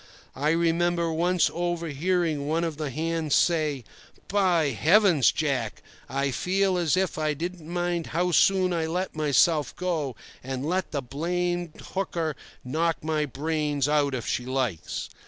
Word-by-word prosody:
I 145 +3 0
remember 170 0 +1
once 175 +2 +2
over 175 -1 -2
hearing 160 -1 0
one 160 +2 +1
of 165 -3 -3
the 155 -2 -3
hands 160 +1 -1
say: 155 -6 +2 0.5
"By 180 -7 +3
Heavens, 165 - +4
Jack! 135 -8 -2 0.3
I 140 0 0
feel 190 +7 +1
as 175 -1 +1
if 185 -4 0
I 155 -1 0
didn't 170 +1 -6
mind 175 -1 -1
how 180 +2 0
soon 185 +1 +4
I 165 -2 0
let 180 +2 -2
myself 150 -1 +2
go, 160 -8 -2 0.3
and 130 +1 -4
let 185 +2 0
the 140 -3 -3
blamed 175 +5 -2
hooker 170 -5 -2 0.3
knock 160 +5 0
my 155 -1 0
brains 150 0 -1
out 145 -2 +2
if 120 - -4
she 125 - -1
likes." 125 -9 -2
160 Hz, 150 wpm, -26 LUFS, 145-175 Hz, 0.5 s, Heavens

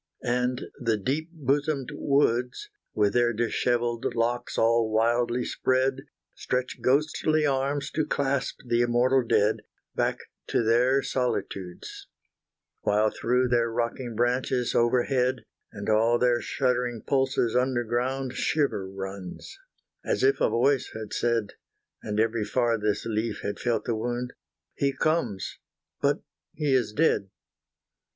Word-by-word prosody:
And 125 +1 0 0.2
the 115 -4 +1
deep 140 - -2
bosomed 145 -2 -1
woods, 140 - +1 0.3
With 105 -1 +2
their 120 -1 +3
dishevelled 120 +1 0
locks 120 +1 -1
all 115 0 +3
wildly 120 +2 +1
spread, 130 +1 0 0.3
Stretch 125 0 -3
ghostly 155 +3 +2
arms 140 +1 0
to 155 -1 -1
clasp 140 -2 -1
the 120 -1 +2
immortal 120 +2 +3
dead, 110 -2 +2 0.4
Back - - 0 0.3
to - - +1
their 125 +4 +3
solitudes 100 -8 -3 0.7
While 105 +1 +2
through 125 +1 +1
their 120 -1 +2
rocking 120 +1 -3
branches 125 +1 0
overhead, 125 +1 +1 0.3
And 100 0 -7
all 110 +2 +3
their 120 -1 +2
shuddering 125 -3 -1
pulses 130 -4 +1
underground 125 +1 0
shiver 135 -11 0
runs, 95 -1 -7 0.5
as - - -1
if 410 0 +3
a - - +4
voice 130 +3 +2
had 110 -1 -6
said 115 -3 0 0.5
And 105 0 -3
every 110 0 +1
farthest 110 -2 0
leaf 110 0 -2
had 100 - -3
felt 120 -2 -1
the 120 - 0
wound 120 +2 -3 0.4
He 140 -1 0
comes 155 - -1 0.4
but - - +1 0.3
he 145 -2 0
is 120 -5 +2
dead! 105 -6 +1
120 Hz, 125 wpm, -27 LUFS, 115-130 Hz, 0.7 s, a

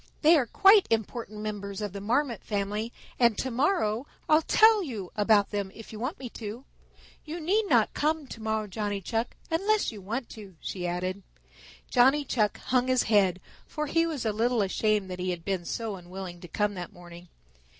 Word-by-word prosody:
They 320 +3 +7
are 265 -6 +2
quite 395 - +6
important 220 -1 -2
members 205 -2 -5
of 205 -3 -4
the 200 - -6
Marmot 240 +2 0
family, 210 +2 -2 0.3
and 235 -4 +4
to 260 - -2
morrow 255 - +1 0.2
I'll 310 +1 +5
tell 435 +5 +5
you 215 - -6
about 210 -1 +3
them 200 -2 -2
if 225 0 -11
you 215 - -7
want 260 - -3
me 260 - -6
to. 225 +4 -7 0.6
You 325 +2 -6
need 400 +7 +1
not - - +3
come 310 0 0
tomorrow, 220 -3 -3
Johnny 205 0 -3
Chuck, 225 +5 -2 0.2
unless 405 +6 +2
you 210 -3 -10
want 230 +6 -4
to," 200 -4 -11
she 180 -2 -4
added. 185 +3 -3 0.7
Johnny 270 +4 +4
Chuck 215 -6 +1
hung 255 0 0
his 255 -1 +3
head, 195 -4 +3 0.3
for 300 0 -3
he 330 +3 +2
was 300 -7 -3
a 215 - +1
little 230 +1 +2
ashamed 210 +1 +1
that 180 - -5
he 180 0 -2
had 175 -2 -4
been 190 -3 -2
so 225 +2 -3
unwilling 180 -1 -8
to 175 - -9
come 205 +4 0
that 180 0 -6
morning. 175 -2 -13
220 Hz, 190 wpm, -28 LUFS, 200-260 Hz, 0.7 s, They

